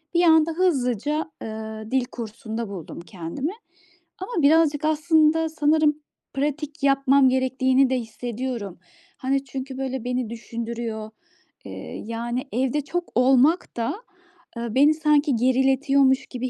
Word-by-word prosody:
Bir 345 Hz, -, +4 dB
anda 320 Hz, -1 st, +5 dB
hızlıca, 300 Hz, -, 0 dB
ııı, 220 Hz, 0 st, -7 dB
dil 260 Hz, -1 st, +2 dB
kursunda 225 Hz, -1 st, -6 dB
buldum 180 Hz, -4 st, -8 dB
kendimi 175 Hz, -, -5 dB, 0.7 s
ama 375 Hz, -1 st, -3 dB
birazcık 305 Hz, 0 st, +4 dB
aslında 315 Hz, +1 st, +3 dB
sanırım 305 Hz, -1 st, +2 dB, 0.4 s
pratik 295 Hz, +1 st, -3 dB
yapmam 275 Hz, -1 st, +4 dB
gerektiğini 260 Hz, 0 st, +2 dB
de 260 Hz, -, +1 dB
hissediyorum. 230 Hz, -3 st, -5 dB, 0.4 s
Hani, 275 Hz, +1 st, -1 dB
çünkü 265 Hz, 0 st, -6 dB
böyle 265 Hz, -2 st, -3 dB
beni 250 Hz, -2 st, -2 dB
düşündürüyor, 230 Hz, -1 st, -5 dB, 0.6 s
ııı, -, -, -8 dB, 0.3 s
yani 235 Hz, +2 st, -3 dB
evde 265 Hz, +4 st, 0 dB
çok 350 Hz, +4 st, -4 dB
olmak 265 Hz, +5 st, +3 dB
da, 230 Hz, +9 st, -1 dB, 0.6 s
ııı, 235 Hz, -1 st, -4 dB
beni 290 Hz, +3 st, +6 dB
sanki 300 Hz, -3 st, +2 dB
geriletiyormuş 265 Hz, +2 st, +3 dB
gibi 255 Hz, 0 st, -4 dB
265 Hz, 120 wpm, -24 LUFS, 235-300 Hz, 0.7 s, beni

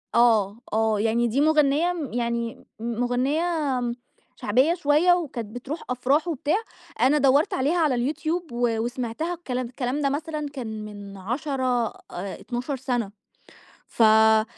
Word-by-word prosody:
آه، 225 Hz, -3 st, +4 dB
آه. 220 Hz, -1 st, +2 dB
يعني 225 Hz, +2 st, +2 dB
دي 245 Hz, +5 st, +1 dB
مُغنيّة 305 Hz, +2 st, +3 dB
م 310 Hz, -9 st, -5 dB
يعني 235 Hz, -1 st, -2 dB
مُ 230 Hz, 0 st, -3 dB
مغنيّة 255 Hz, +6 st, +1 dB, 0.9 s
شعبية 260 Hz, +10 st, +2 dB
شوية 335 Hz, +2 st, +4 dB
وكانت 245 Hz, -10 st, -3 dB
بتروح 280 Hz, +6 st, -5 dB
أفراح 270 Hz, +6 st, +1 dB
وبتاع، 305 Hz, +1 st, 0 dB, 0.4 s
أنا 265 Hz, +5 st, +5 dB
دورت 280 Hz, +2 st, +3 dB
عليها 285 Hz, +7 st, +1 dB
على 280 Hz, -4 st, +1 dB
الYouTube 320 Hz, +1 st, -3 dB
و 235 Hz, -2 st, 0 dB
وسمعتها، 245 Hz, +7 st, -2 dB
الكلام 255 Hz, -7 st, -3 dB
الكلام 250 Hz, +3 st, -3 dB
ده 280 Hz, -, +2 dB
مثلًا 305 Hz, +1 st, -3 dB
كان 220 Hz, -5 st, -5 dB
من 205 Hz, -1 st, -9 dB
10 250 Hz, +3 st, -1 dB
آآ، -, -, -8 dB, 0.2 s
12 245 Hz, +7 st, -4 dB
سنة 245 Hz, -5 st, -2 dB, 0.8 s
فك 220 Hz, -1 st, +5 dB
250 Hz, 135 wpm, -25 LUFS, 230-300 Hz, 0.9 s, أنا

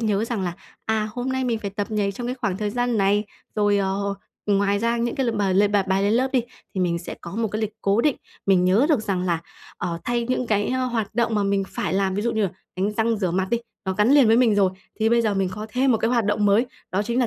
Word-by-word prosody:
nhớ 215 Hz, -1 st, +1 dB
rằng 230 Hz, -4 st, -3 dB
là, 175 Hz, -2 st, -2 dB, 0.3 s
à, 220 Hz, -1 st, 0 dB
hôm 245 Hz, +1 st, -3 dB
nay 260 Hz, 0 st, -1 dB
mình 235 Hz, -3 st, 0 dB
phải 205 Hz, -2 st, -4 dB
tập 205 Hz, +2 st, -4 dB
nhảy 205 Hz, -2 st, 0 dB
trong 240 Hz, +4 st, -5 dB
cái 250 Hz, -, -2 dB
khoảng 205 Hz, -8 st, -2 dB
thời 210 Hz, +1 st, -2 dB
gian 245 Hz, 0 st, 0 dB
này. 205 Hz, +2 st, +2 dB, 0.3 s
Rồi, 205 Hz, -1 st, +2 dB
ờ, 200 Hz, +1 st, -1 dB, 0.3 s
ngoài 200 Hz, 0 st, +2 dB
ra 230 Hz, +2 st, +1 dB
những 235 Hz, 0 st, -1 dB
cái 270 Hz, -3 st, 0 dB
l -, -, +2 dB
mà 205 Hz, -3 st, +1 dB
l 200 Hz, +2 st, +4 dB
bài 205 Hz, -1 st, +2 dB
bài 190 Hz, 0 st, 0 dB
lên 205 Hz, +2 st, +2 dB
lớp 255 Hz, +3 st, +2 dB
đi, 255 Hz, -3 st, +3 dB, 0.3 s
thì 190 Hz, -, -1 dB
mình 170 Hz, -2 st, +1 dB
sẽ 170 Hz, -, -7 dB
có 175 Hz, +5 st, -8 dB
một 230 Hz, -1 st, 0 dB
cái 215 Hz, +2 st, -3 dB
lịch 215 Hz, -, -2 dB
cố 200 Hz, +3 st, +2 dB
định, 295 Hz, +1 st, +2 dB, 0.3 s
mình 190 Hz, -2 st, +4 dB
nhớ 200 Hz, +10 st, +4 dB
được 295 Hz, -8 st, +3 dB
rằng 195 Hz, -4 st, -1 dB
là, 170 Hz, -3 st, 0 dB, 0.4 s
ờ, 170 Hz, -1 st, -3 dB
thay 240 Hz, -1 st, 0 dB
những 255 Hz, -1 st, 0 dB
cái, 205 Hz, -2 st, +1 dB
ơ, 255 Hz, 0 st, 0 dB
hoạt 230 Hz, -4 st, -2 dB
động 235 Hz, -1 st, +1 dB
mà 205 Hz, -, +2 dB
mình 200 Hz, 0 st, +1 dB
phải 165 Hz, -, -3 dB
làm. 190 Hz, 0 st, +1 dB
Ví 205 Hz, -, -1 dB
dụ 235 Hz, +1 st, 0 dB
như 220 Hz, -1 st, 0 dB
là 195 Hz, -, +1 dB, 0.3 s
đánh 195 Hz, +3 st, 0 dB
răng 225 Hz, +1 st, +1 dB
rửa 185 Hz, -4 st, 0 dB
mặt 185 Hz, +2 st, 0 dB
đi, 235 Hz, -, +2 dB, 0.3 s
nó 190 Hz, -, -1 dB
gắn 210 Hz, +5 st, +3 dB
liền 280 Hz, -4 st, +7 dB
với 225 Hz, +1 st, +5 dB
mình 240 Hz, -4 st, +4 dB
rồi, 195 Hz, -2 st, +3 dB, 0.3 s
thì 220 Hz, -, +3 dB
bây 235 Hz, 0 st, +3 dB
giờ 215 Hz, -2 st, +1 dB
mình 195 Hz, -1 st, +1 dB
có 210 Hz, +2 st, -6 dB
thêm 260 Hz, +1 st, +3 dB
một 225 Hz, -, +2 dB
cái 225 Hz, -, +1 dB
hoạt 235 Hz, -3 st, +2 dB
động 210 Hz, 0 st, +1 dB
mới, 205 Hz, +5 st, +4 dB, 0.2 s
đó 190 Hz, +2 st, 0 dB
chính 235 Hz, +3 st, -1 dB
là 245 Hz, -, +3 dB
210 Hz, 290 wpm, -23 LUFS, 195-235 Hz, 0.4 s, liền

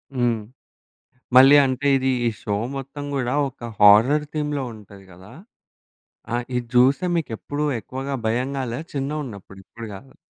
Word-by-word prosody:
హ్మ్. 120 Hz, -3 st, +1 dB, 1.0 s
మళ్ళీ 135 Hz, +3 st, +9 dB
అంటే 130 Hz, +2 st, -1 dB
ఇది 130 Hz, 0 st, 0 dB, 0.2 s
ఈ -, -, +3 dB
షో? 105 Hz, -2 st, -2 dB, 0.2 s
మొత్తం 135 Hz, +2 st, -7 dB
గూడా 125 Hz, -2 st, -1 dB, 0.2 s
ఒక 120 Hz, -2 st, -9 dB
హారర్ 115 Hz, +9 st, +6 dB
థీమ్‌లో 150 Hz, -2 st, -2 dB
ఉంటది 100 Hz, -2 st, -14 dB
గదా! 95 Hz, +3 st, -15 dB, 1.0 s
ఆ! -, -, +2 dB, 0.2 s
ఇది 125 Hz, -, 0 dB
జూస్తే 135 Hz, +8 st, +4 dB
మీకెప్పుడు 145 Hz, -1 st, -3 dB, 0.2 s
ఎక్కువగా 135 Hz, +4 st, -6 dB
భయం 125 Hz, +4 st, -1 dB
గాలే 125 Hz, -1 st, -3 dB
చిన్నగున్నప్పుడు 135 Hz, -9 st, -5 dB
ఇప్పుడు 115 Hz, -1 st, -10 dB
గాదు? 130 Hz, +7 st, -13 dB
130 Hz, 135 wpm, -22 LUFS, 115-140 Hz, 1.0 s, మళ్ళీ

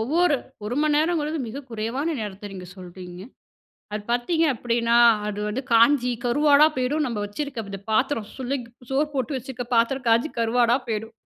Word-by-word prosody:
ஒவ்வொரு 305 Hz, +6 st, +2 dB, 0.3 s
1 220 Hz, +4 st, -3 dB
மணி 305 Hz, -1 st, +2 dB
நேரங்கிறது 315 Hz, -1 st, 0 dB
மிக 275 Hz, +6 st, -6 dB
குறைவான 240 Hz, +9 st, -2 dB
நேரத்த 205 Hz, -1 st, -6 dB
நீங்க 185 Hz, -1 st, -8 dB
சொல்றீங்க. 180 Hz, 0 st, -10 dB, 0.7 s
அது 210 Hz, 0 st, -3 dB
பார்த்தீங்க 245 Hz, +8 st, +1 dB
அப்டின்னா, 235 Hz, -1 st, +1 dB, 0.3 s
அது 210 Hz, 0 st, -3 dB
வந்து 235 Hz, +6 st, -3 dB
காஞ்சி 245 Hz, +2 st, +5 dB
கருவாடா 290 Hz, +4 st, +5 dB
போயிடும் 280 Hz, +4 st, 0 dB
நம்ப 235 Hz, -4 st, -3 dB
வச்சுருக்க 235 Hz, +3 st, -5 dB
இந்த 195 Hz, -, -6 dB
பாத்திரம் 225 Hz, 0 st, +1 dB
சுள்ளங் 265 Hz, 0 st, -3 dB, 0.3 s
சோறு 275 Hz, +3 st, +2 dB
போட்டு 275 Hz, 0 st, -2 dB
வச்சுருக்க 255 Hz, 0 st, -6 dB
பாத்திரம் 245 Hz, +3 st, +1 dB
காஞ்சி 230 Hz, +6 st, +3 dB
கருவாடா 235 Hz, +1 st, +3 dB
போயிடும். 225 Hz, 0 st, -3 dB
245 Hz, 155 wpm, -24 LUFS, 220-285 Hz, 0.7 s, காஞ்சி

